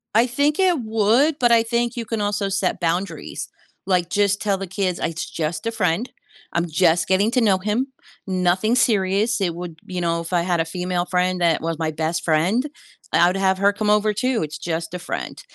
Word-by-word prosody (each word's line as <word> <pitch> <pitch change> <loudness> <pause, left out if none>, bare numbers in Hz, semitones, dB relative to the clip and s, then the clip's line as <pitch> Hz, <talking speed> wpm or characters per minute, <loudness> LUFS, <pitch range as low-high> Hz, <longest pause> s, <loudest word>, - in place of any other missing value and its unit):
I 230 +3 +5
think 285 +6 0
it 365 -5 +3
would, 225 +7 +2
but 240 -1 +3
I 230 -1 +6
think 235 +1 -1
you 235 - -3
can 220 0 -3
also 205 0 -1
set 195 -1 -1
boundaries, 175 +3 -3 0.4
like, 180 -2 +1
just 200 0 +1
tell 200 -2 +1
the 195 - -5
kids, 185 -1 -1
"I - - 0
it's 165 0 -5
just 155 +1 -3
a - - 0
friend, 215 +1 0 0.4
I'm 170 0 0
just 160 0 +2
getting 200 +4 +3
to 250 0 +2
know 200 -4 +4
him, 210 +7 -1 0.4
nothing 185 +4 +1
serious, 215 -1 +2
it 175 -3 0
would 175 -1 -7
you 180 -1 -5
know, 170 -1 0
if 165 - -8
I 175 - +3
had 175 -2 +1
a - - -1
female 180 +1 -2
friend 180 0 0
that 170 -2 +3
was 165 0 -2
my 160 -1 -1
best 160 +2 -2
friend, 175 - +2 0.5
I'd 175 +2 +4
have 190 -1 +2
her 200 +1 +3
come 210 +1 -1
over, 210 0 +3
too, 250 +3 0
it's 155 0 -4
just 165 +1 -4
a 180 - -4
friend." - - -5
190 Hz, 210 wpm, -22 LUFS, 175-220 Hz, 0.5 s, I